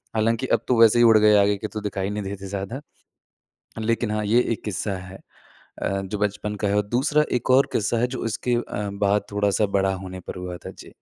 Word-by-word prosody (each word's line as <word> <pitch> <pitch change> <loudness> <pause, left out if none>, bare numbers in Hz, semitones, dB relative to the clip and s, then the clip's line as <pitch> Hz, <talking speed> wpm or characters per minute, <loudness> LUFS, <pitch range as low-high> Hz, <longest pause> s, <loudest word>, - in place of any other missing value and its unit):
हालाँकि 115 +3 +1
अब - - -20
तो 120 -3 +2
वैसे 115 +1 +6
ही - - +6
उड़ 110 -1 +7
गए 105 0 +5
आगे 100 0 +2
के 110 - -5
तो 110 0 -6
दिखाई 100 -1 -3
नहीं 105 0 -3
देते 100 0 -6
ज़्यादा। 100 +8 -5 1.0
लेकिन 115 0 0
हाँ, 105 0 -1
ये 115 +4 +4
एक - - -6
किस्सा 100 0 -2
है 95 +1 -10 0.6
अ, 95 0 -1
जो 100 +2 -4
बचपन 105 0 -2
का 105 0 -2
है 100 - +1
और 105 - +1
दूसरा 145 +6 +2
एक 125 - -1
और 135 +2 +5
किस्सा 110 +2 0
है 125 - +2
जो 130 - -6
उसके 115 +2 -1
अ, 105 -3 -3
बाद 100 0 +1
थोड़ा-सा 105 +1 +1
बड़ा 95 0 +1
होने 95 0 -8
पर - - -6
हुआ 90 -1 -6
था। - - -6
जी। - - -14
105 Hz, 230 wpm, -23 LUFS, 100-115 Hz, 1.0 s, उड़